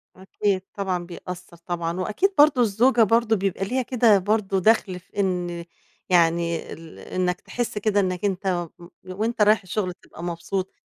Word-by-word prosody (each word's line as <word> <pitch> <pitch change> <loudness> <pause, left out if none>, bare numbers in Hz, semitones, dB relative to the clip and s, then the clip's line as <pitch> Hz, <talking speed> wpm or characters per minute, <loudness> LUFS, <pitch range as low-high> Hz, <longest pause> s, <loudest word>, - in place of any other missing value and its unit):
أكيد 190 +1 -1
طبعًا 185 -3 -2
بيأثر 180 0 -9
طبعًا، 170 0 -4
وأكيد 215 - 0
برضو 290 -3 +6
الزوجة 235 +2 +4
برضو 225 +1 +3
بيبقى 195 -1 -1
ليها 255 +6 0
كده 235 -4 +4
برضو 195 0 0
دخل 190 -2 +2
في 185 +3 -11
إن 175 -3 -1 0.4
يعني 170 -1 +2
ال 165 -1 -12
إنك 180 0 -2
تحس 240 -3 -4
كده 210 0 +1
إنك 185 -1 -1
أنت 185 -3 -1
م 170 - -12 0.2
وأنت 215 +5 -2
رايح 210 +1 +5
الشغل 185 0 -3
تبقى 170 - -13
مبسوط. 175 +2 -3
190 Hz, 155 wpm, -24 LUFS, 175-215 Hz, 0.4 s, برضو